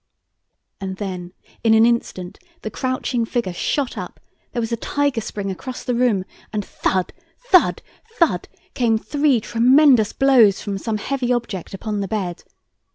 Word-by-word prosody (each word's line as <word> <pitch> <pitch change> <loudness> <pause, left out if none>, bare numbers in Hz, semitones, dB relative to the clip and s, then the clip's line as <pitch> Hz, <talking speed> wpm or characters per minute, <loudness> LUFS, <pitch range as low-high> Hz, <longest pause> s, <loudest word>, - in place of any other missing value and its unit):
And 190 -1 -5
then, 185 -3 -5 0.3
in 225 -1 +5
an 220 +1 +6
instant, 210 -6 -1 0.2
the 215 - -4
crouching 255 -2 -1
figure 230 -5 -2
shot 270 +9 -1
up, - - -8 0.3
there 245 - -3
was 225 0 -2
a - - +2
tiger 285 +1 -1
spring 200 -2 -4
across 250 +7 -7
the 250 - -1
room 235 -6 +2 0.3
and 210 -2 -2
thud, 185 -1 -1 0.2
thud, 485 -8 +3 0.3
thud, 300 - +2 0.3
came 230 -3 +2
three 285 +1 +1
tremendous 245 +1 +4
blows 245 -8 +5
from 200 -2 -4
some 220 +1 -2
heavy 255 +3 -2
object 225 -7 -3
upon 210 +1 -3
the 200 - -2
bed. 185 -4 -3
225 Hz, 155 wpm, -21 LUFS, 195-255 Hz, 0.3 s, an